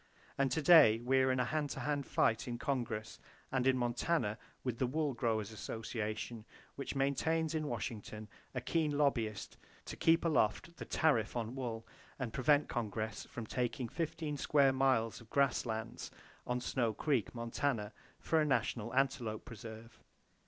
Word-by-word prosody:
And 135 -1 +2
to 155 - 0
day 145 -9 +8
we 130 +2 +3
are 130 0 +4
in 130 - +1
a 125 - +2
hand 150 +1 -1
to - - -4
hand 145 -2 -1
fight 115 +2 +2
in 120 -1 -3
Congress, 120 -5 -3 0.3
and 130 -1 +1
in 130 -1 +4
Montana, 120 -1 0 0.2
with 125 -3 -3
the 130 - +2
Wool 150 +1 0
Growers 110 -4 -1
Association, 110 +1 -4 0.3
which 140 - -5
maintains 160 +4 +1
in 155 -1 -1
Washington 110 -5 -5 0.3
a 125 - -1
keen 150 +2 0
lobbyist 115 -8 0 0.3
to - - -6
keep 165 +1 +3
aloft 155 +2 +1
the - - -6
tariff 125 - +2
on 115 0 -3
wool, 120 -4 -4 0.3
and 125 -4 -4
prevent 145 +3 +3
Congress 110 -1 -3
from 115 - -7
taking 125 +2 -2
15 155 +1 -3
square 140 -1 +4
miles 130 -5 +2
of 115 - -16
grass 140 -3 +2
lands 110 0 -4 0.4
on 125 0 0
Snow 120 -3 0
Creek, 130 -5 0
Montana, 115 -2 -1 0.3
for 160 -1 +2
a - - +4
National 120 -4 0
Antelope 125 -5 0
Preserve. 115 +1 -10
125 Hz, 160 wpm, -35 LUFS, 115-145 Hz, 0.4 s, day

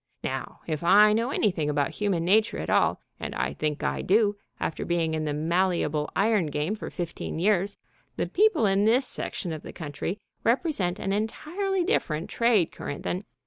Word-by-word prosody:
Now, - - -4
if 155 -3 -3
I 210 +4 +7
know 230 +3 +1
anything 180 - +1
about 145 -1 0
human 195 -5 -1
nature 215 +4 +3
at - - -3
all - - +3 0.2
and - - -5
I - - -1
think 150 -1 -2
I - - 0
do, 205 +1 +3 0.2
after - - -2
being 165 -2 0
in 155 -1 -1
the 150 - -1 0.2
malleable 170 -5 +1
iron 205 -4 +2
game 150 +7 -1
for 220 - -6
fifteen 170 -2 -5
years 195 +2 +1 0.4
the - - 0
people 395 - +3
in 195 +1 +3
this 245 +5 +4
section 175 -7 -4
of 155 - -6
the - - -9
country 155 +5 -4 0.3
represent 230 - +1
an 195 - -2
entirely 350 - -1
different 165 - -1
trade 230 -7 +3
current 140 - -6
than...." 180 - -2
195 Hz, 180 wpm, -27 LUFS, 160-220 Hz, 0.4 s, I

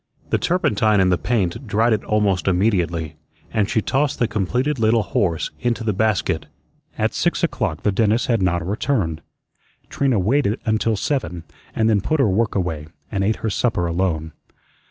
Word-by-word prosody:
The - - +2
turpentine 110 - +2
in 95 -1 +4
the 90 - +3
paint 115 +1 -1
dried 110 +3 +2
it 110 - -1
almost 100 -5 +1
immediately, 90 -5 0 0.4
and 105 -2 +1
she 110 - +1
tossed 140 +1 0
the 120 - +1
completed 125 +8 -1
little 110 0 +3
horse 85 -6 -1
into 120 -1 -1
the 110 -2 0
basket. 110 0 0 0.5
At - - 0
six - - 0
o'clock - - -1
the 105 - +2
dentist 110 +3 +2
had 115 -4 +1
not 85 -2 0
returned. 95 - -1 0.7
Trina 135 -4 +1
waited 110 +3 +1
until 110 0 +1
seven, 105 - -2 0.3
and 110 - +2
then 105 -3 +3
put 155 +9 0
her 135 - +4
work 110 +3 0
away, 80 -6 -2 0.2
and 95 -1 -1
ate 110 +3 +1
her - - +1
supper 110 -5 0
alone. 85 -2 -1
105 Hz, 170 wpm, -21 LUFS, 90-115 Hz, 0.7 s, in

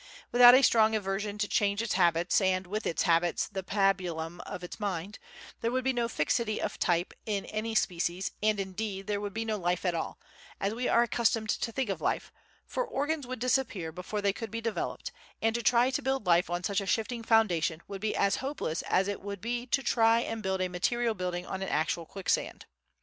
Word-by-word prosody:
Without 245 0 +9
a 270 - +5
strong 220 -2 +5
aversion 205 0 -2
to 205 0 0
change 200 0 +1
its 230 -1 -1
habits 175 0 +3
and, 185 -1 +1
with 210 +4 -3
its 165 - 0
habits, 170 0 +2
the 195 -2 -4
pabulum 180 -4 0
of 180 - -6
its 180 - -8
mind, 200 -1 -3 0.4
there 230 - 0
would 255 +1 -1
be 265 +1 +1
no 240 -1 0
fixity 215 +5 0
of - - -3
type 175 -1 +1
in 205 -2 -1
any 220 +1 -3
species 180 -1 0
and, 215 -1 +2
indeed, 195 0 -4
there 205 -1 -2
would 205 -1 -4
be 225 0 -2
no 220 -1 -1
life 175 0 -1
at 180 - +2
all, 165 - -4 0.4
as 195 +2 -1
we 245 +2 -2
are 235 - +4
accustomed 225 -1 +1
to 230 - -2
think 250 -3 -1
of 175 -5 -4
life, - - -1 0.3
for - - -2
organs 290 - -2
would 255 0 -4
disappear 235 -9 0
before 185 +5 -5
they 200 -1 +2
could 225 +2 -6
be 225 +3 -4
developed, 230 -1 -3 0.3
and 225 0 +1
to 235 - -1
try 245 +2 +4
to - - -1
build 265 -4 -1
life 175 0 +3
on 175 +1 -2
such 200 0 0
a 195 - -6
shifting 230 +4 -1
foundation 185 -8 +2
would 195 -1 -7
be 215 0 -1
as 200 0 +2
hopeless 265 - -3
as 190 +1 +2
it 205 - -3
would 200 0 -6
be 240 +4 -3
to 270 +2 +1
try 230 -1 +4
and 225 -1 -4
build 190 -2 -1
a 185 - +1
material 230 +6 0
building 180 -2 -3
on 190 +1 -5
an 195 - -3
actual 160 +1 -1
quicksand. 195 -2 -2
205 Hz, 215 wpm, -29 LUFS, 185-230 Hz, 0.4 s, Without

